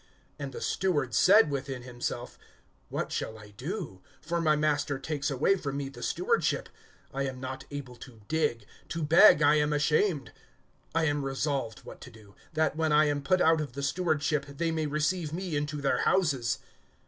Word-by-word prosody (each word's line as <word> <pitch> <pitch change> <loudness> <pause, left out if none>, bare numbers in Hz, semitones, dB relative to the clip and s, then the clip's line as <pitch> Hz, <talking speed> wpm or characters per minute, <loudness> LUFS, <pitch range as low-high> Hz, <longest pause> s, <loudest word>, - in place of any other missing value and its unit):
(3)And 140 -2 -5
the - - -8
steward 145 -10 0
said 195 - +6
within 135 -2 -4
himself: 120 -1 -5 0.5
What - - -3
shall 110 - -3
I 105 -1 -13
do? 140 - -6 0.2
for 170 +2 -2
my 155 -2 +3
master 150 -2 0
takes 140 0 -3
away 145 +8 +2
from 140 -5 -4
me 140 -1 -3
the 135 - -12
stewardship. - - 0 0.4
I 140 +1 -1
am 130 -1 -6
not 130 0 -6
able 140 -4 -7
to 120 -4 -13
dig; 150 -9 0 0.2
to 165 -1 -3
beg 160 +1 +7
I 150 0 +5
am 150 0 +1
ashamed. 150 - +1 0.6
(4)I 165 -1 +3
am 145 -1 0
resolved 135 -4 -2
what - - -11
to - - -10
do, 105 -3 -17 0.2
that, 155 -1 +1
when 160 -1 0
I 150 +1 +5
am 145 -1 0
put 185 +6 +2
out 160 -1 +4
of 145 -5 -5
the 140 +2 -5
stewardship, 150 -2 0
they 165 +4 -2
may 160 -1 -1
receive 155 +2 -1
me 180 -2 -3
into 145 0 -2
their 140 - +1
houses. 140 -11 +1
145 Hz, 185 wpm, -29 LUFS, 135-160 Hz, 0.6 s, beg